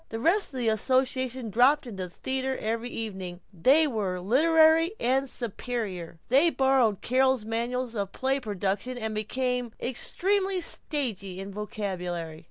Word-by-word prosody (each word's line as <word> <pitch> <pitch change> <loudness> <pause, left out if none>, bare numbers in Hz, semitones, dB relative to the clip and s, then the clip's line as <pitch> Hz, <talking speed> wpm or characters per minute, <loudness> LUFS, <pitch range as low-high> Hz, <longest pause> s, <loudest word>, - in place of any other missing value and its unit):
The 225 - -4
rest 360 - +2
of 265 - -6
the 240 -2 0
association 255 +1 0
dropped 265 +7 +4
into 205 -6 -6
the - - -9
theater 265 +7 -2
every 230 +2 -2
evening, 190 -7 -5 0.2
and 290 +1 +5
were 190 -4 -1
literary 320 - +4
and 265 +2 +1
superior. 215 -8 -4
They 270 +6 +5
had 335 - 0
borrowed 265 -6 +3
Carol's 260 -2 +2
manuals 235 +2 -2
of 200 -3 -3
play 265 +1 0
production 205 +1 -2
and 245 - -7
had 220 0 -2
become 250 +2 -2
extremely 380 +9 0
stagey 220 - -2
in 195 +1 -6
vocabulary. 180 -6 -4
245 Hz, 150 wpm, -27 LUFS, 205-265 Hz, 0.2 s, and